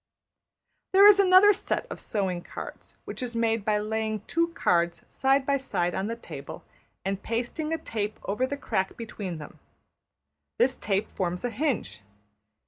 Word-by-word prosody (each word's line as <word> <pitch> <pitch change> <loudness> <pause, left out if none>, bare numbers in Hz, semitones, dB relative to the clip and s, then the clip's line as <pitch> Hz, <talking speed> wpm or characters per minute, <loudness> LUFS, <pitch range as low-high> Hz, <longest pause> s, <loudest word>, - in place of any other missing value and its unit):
There 390 +1 +8
is 410 -1 +8
another 390 +2 +7
set - - -2
of - - -6
sewing 190 -5 -2
cards - - -9
which - - -6
is 245 -2 -4
made 225 -2 +1
by 210 0 +2
laying 220 0 -2
two 335 +9 +1
cards 170 -1 +1
side 270 0 +2
by 280 0 +2
side 175 -10 -1
on 195 - -1
the 230 - -3
table 155 -11 -9 0.4
and 195 0 -2
pasting 240 +9 -3
a 325 - +1
tape 215 -7 -4
over 230 +6 0
the 285 +1 -4
crack 190 -8 -2
between 205 -6 -5
them. 150 -1 -11 1.0
This 260 +1 +3
tape 200 0 -1
forms 180 +2 -2
a 245 - -1
hinge. 260 - -2
220 Hz, 160 wpm, -27 LUFS, 195-270 Hz, 1.0 s, There